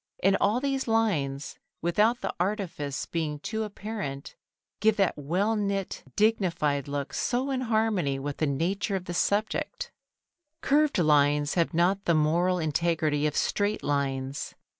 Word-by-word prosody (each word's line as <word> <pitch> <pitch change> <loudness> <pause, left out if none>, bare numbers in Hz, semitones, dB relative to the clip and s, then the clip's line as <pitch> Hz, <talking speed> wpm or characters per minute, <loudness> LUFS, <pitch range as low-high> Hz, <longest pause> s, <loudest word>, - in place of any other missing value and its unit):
And 195 +1 +5
all 210 +5 +3
these 270 -1 -1
lines, 160 -12 0 0.2
without 215 +8 +2
the - - -2
artifice 175 -7 -2
being 155 -3 -2
too 220 +9 -4
apparent, 205 -9 -6 0.4
give 215 +1 +3
that 195 -3 +2
well 180 +10 0
knit, 200 -2 -2
dignified 170 -10 +1
look 140 0 -4
so 255 +3 0
in 260 -1 -1
harmony 220 - +1
with 140 +1 -4
the 155 - +1
nature 185 +8 -1
of 185 -1 -3
the 175 - -5
subject. 210 - 0
[Sidenote: 335 -9 -26
Curved - - -1
Lines] 300 0 +5
Curved 175 - +2
lines 145 0 +3
have 170 0 +1
not 185 +4 +2
the 170 - +3
moral 170 +4 +2
integrity 155 -2 +1
of 150 - -3
straight 205 +1 0
lines. 135 -1 -2
180 Hz, 155 wpm, -27 LUFS, 150-215 Hz, 0.4 s, And